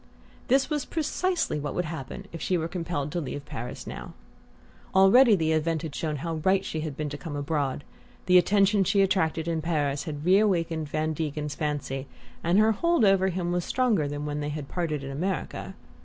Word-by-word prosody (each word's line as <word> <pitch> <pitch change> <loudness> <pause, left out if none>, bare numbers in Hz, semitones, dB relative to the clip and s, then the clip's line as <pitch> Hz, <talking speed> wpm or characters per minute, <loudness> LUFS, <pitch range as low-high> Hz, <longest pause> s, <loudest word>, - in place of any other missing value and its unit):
This 270 +1 +3
was 300 -2 -1
precisely 340 - -1
what 145 -1 -4
would 180 - 0
happen 155 +4 -6
if 165 - -6
she 185 - +1
were 165 -1 -2
compelled 165 -4 -3
to 175 - -2
leave 140 0 -5
Paris 120 -3 -6
now. - - -7 0.8
Already 210 +5 +7
the 160 -3 +1
event 160 0 0
had 155 -3 -5
shown 155 0 -2
how 165 +3 -3
right 190 0 +3
she 160 - -3
had 155 -3 -4
been 155 - -2
to 145 0 -6
come 145 +1 -6
abroad: 145 -1 -1 0.4
the 180 0 +7
attention 200 +1 +3
she 200 +1 +3
attracted 170 -4 +1
in 165 -1 0
Paris 145 -3 -1
had 150 -2 -5
reawakened 170 -5 +2
Van 155 +1 -1
Degen's 150 -1 -3
fancy, 145 -3 -3 0.4
and 170 +3 +3
her 215 +1 +5
hold 335 +2 +2
over 195 -1 +4
him 175 -1 -1
was 175 0 0
stronger 225 - +1
than 145 +1 -4
when 150 0 -3
they 145 0 -2
had 145 -1 -5
parted 155 -5 -2
in 135 - -5
America. 170 +4 -3
165 Hz, 195 wpm, -27 LUFS, 150-190 Hz, 0.8 s, Already